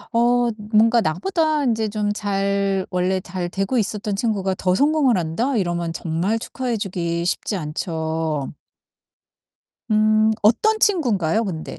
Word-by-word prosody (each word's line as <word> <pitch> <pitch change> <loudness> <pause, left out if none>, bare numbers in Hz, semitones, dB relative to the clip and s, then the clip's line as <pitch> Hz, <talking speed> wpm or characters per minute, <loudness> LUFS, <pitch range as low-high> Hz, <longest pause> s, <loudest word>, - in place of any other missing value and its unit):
어 240 0 +3 0.2
뭔가 230 +2 +5
'나보다 305 - 0
인제 225 -2 0
좀 210 0 -1
잘 200 -1 -1
원래 180 +1 0
잘 180 -1 -5
되고 195 +7 -1
있었던 210 -1 -2
친구가 195 -3 -1
더 180 -1 +1
성공을 285 0 +3
한다?' 205 +11 -1
이러면 175 -3 -1
정말 170 +7 -1
축하해 245 0 -3
주기 170 -3 -2
쉽지 195 +3 -1
않죠. 160 -2 -3 1.4
음 215 0 +3
어떤 430 - +3
친군가요 230 - +2
근데? 165 -6 -6
200 Hz, 255 characters per minute, -21 LUFS, 175-230 Hz, 1.4 s, 뭔가